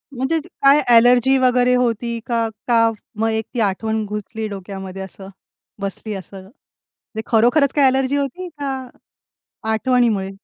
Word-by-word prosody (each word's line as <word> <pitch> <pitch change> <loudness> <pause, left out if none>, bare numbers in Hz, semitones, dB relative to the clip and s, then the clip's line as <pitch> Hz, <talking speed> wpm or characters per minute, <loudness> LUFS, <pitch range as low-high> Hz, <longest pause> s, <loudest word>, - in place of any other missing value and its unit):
म्हणजे 265 +6 0 0.2
काय 275 +2 +7
अ‍ॅलर्जी 245 +3 +5
वगैरे 250 -1 +3
होती 235 -1 -1
का? 230 -2 0 0.2
का 230 -2 +4 0.3
मग 225 - +1
एक 220 0 -1
ती 245 - -3
आठवण 220 +2 0
घुसली 210 +1 -5
डोक्यामध्ये 195 -1 -7
असं? 190 0 -9 0.5
बसली 200 +2 -4
असं. 195 +1 -9
म्हणजे 190 +6 -21 0.6
खरोखरच 245 +5 +3
काही 285 -2 +4
अ‍ॅलर्जी 265 +1 +1
होती 285 +6 -3
का 275 -2 -2 1.0
आठवणीमुळे? 220 -4 +1
230 Hz, 130 wpm, -20 LUFS, 210-260 Hz, 1.0 s, काय